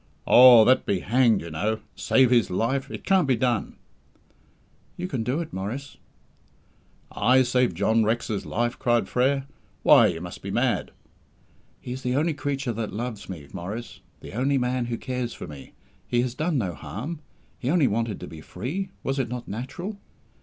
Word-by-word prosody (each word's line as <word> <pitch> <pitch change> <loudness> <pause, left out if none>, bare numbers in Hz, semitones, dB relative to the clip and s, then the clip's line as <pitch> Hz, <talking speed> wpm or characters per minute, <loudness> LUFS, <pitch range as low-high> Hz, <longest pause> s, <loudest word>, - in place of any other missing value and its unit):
"Oh, 120 -3 +9
that 130 +2 +3
be 95 -2 0
hanged, 115 -1 +3
you 85 - -8
know! 105 +8 -1 0.2
Save 130 -2 +3
his 120 -5 +4
life! 120 +8 -1
It - - -7
can't 190 -6 +3
be 130 - +3
done." 120 -2 -1 1.2
"You 180 - -3
can 135 -9 -3
do 125 +7 -1
it, 165 - -7
Maurice." 115 +10 -5 1.1
"I 130 +5 +4
save 125 -6 +1
John 110 +6 +2
Rex's 110 -1 -1
life?" 120 +1 -2
cried 120 -1 +2
Frere. 135 +2 +1 0.4
"Why, - - +7
you - - -2
must - - -8
be - - -6
mad!" - - 0 0.9
"He 125 - -8
is 130 +1 -5
the 125 0 -1
only 155 +3 +1
creature 140 -3 -2
that 110 -1 -4
loves 115 -1 -5
me, 80 -7 -7
Maurice 105 +7 -6 0.2
the - - -10
only 135 +5 +1
man 125 -1 0
who 120 -1 -3
cares 125 -1 -4
for - - -7
me. 70 -2 -11 0.3
He 120 - +1
has 125 -1 -3
done 155 +3 -1
no 95 -8 -1
harm. 110 - -6 0.4
He 125 - -2
only 165 -2 +3
wanted 115 -2 -1
to - - -6
be 80 -1 -10
free 145 - -5
was 135 +1 -1
it 125 -3 -1
not 125 0 -6
natural? 175 - -6
125 Hz, 180 wpm, -25 LUFS, 110-135 Hz, 1.2 s, Oh